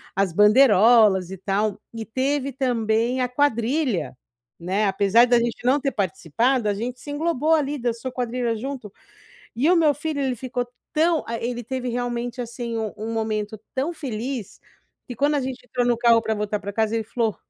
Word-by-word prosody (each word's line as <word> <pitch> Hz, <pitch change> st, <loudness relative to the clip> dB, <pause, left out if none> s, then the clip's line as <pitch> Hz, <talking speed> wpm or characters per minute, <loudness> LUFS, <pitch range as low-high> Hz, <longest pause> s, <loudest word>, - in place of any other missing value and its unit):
as 195 Hz, -3 st, +1 dB
bandeirolas 210 Hz, -3 st, +5 dB
e 190 Hz, -, -7 dB
tal, 200 Hz, +2 st, -1 dB
e 225 Hz, -1 st, -5 dB
teve 270 Hz, +4 st, -1 dB
também 240 Hz, -1 st, 0 dB
a 250 Hz, -, 0 dB
quadrilha, 240 Hz, -, 0 dB, 0.4 s
né, 190 Hz, +5 st, 0 dB
apesar 200 Hz, +4 st, +4 dB
de 245 Hz, 0 st, +3 dB
a -, -, +5 dB
gente 235 Hz, 0 st, -3 dB
não 260 Hz, +4 st, +3 dB
ter 275 Hz, -1 st, -1 dB
participado, 215 Hz, -, 0 dB
a 205 Hz, -, +2 dB
gente 240 Hz, +5 st, -5 dB
se 290 Hz, -, -8 dB
englobou 315 Hz, 0 st, +1 dB
ali, 295 Hz, -2 st, +1 dB
dançou 240 Hz, 0 st, -3 dB
quadrilha 245 Hz, -1 st, -2 dB
junto, 245 Hz, -2 st, -6 dB, 0.6 s
e 270 Hz, +9 st, +2 dB
o 360 Hz, -, +5 dB
meu 315 Hz, -3 st, +4 dB
filho 295 Hz, +1 st, -3 dB
ele 260 Hz, -2 st, 0 dB
ficou 245 Hz, +1 st, -3 dB, 0.3 s
tão, 325 Hz, +1 st, +2 dB
ah, 230 Hz, -, -2 dB
ele 240 Hz, +1 st, -3 dB
teve 255 Hz, +1 st, -4 dB
realmente, 245 Hz, 0 st, -3 dB
assim, 235 Hz, -1 st, -4 dB
um 220 Hz, -2 st, -3 dB
um 220 Hz, +2 st, -5 dB
momento 215 Hz, -1 st, -3 dB
tão 275 Hz, +6 st, -1 dB
feliz, 255 Hz, -, -5 dB, 0.5 s
que 245 Hz, -, -7 dB
quando 285 Hz, +5 st, +1 dB
a -, -, +1 dB
gente 255 Hz, -1 st, -5 dB
entrou 245 Hz, -1 st, -1 dB
no 240 Hz, -1 st, +2 dB
carro 235 Hz, -1 st, +4 dB
pra 220 Hz, -1 st, -1 dB
voltar 210 Hz, 0 st, -2 dB
pra 200 Hz, 0 st, -6 dB
casa 220 Hz, +1 st, 0 dB
ele 225 Hz, -, -2 dB
falou: 225 Hz, -1 st, -1 dB
240 Hz, 190 wpm, -23 LUFS, 215-260 Hz, 0.6 s, bandeirolas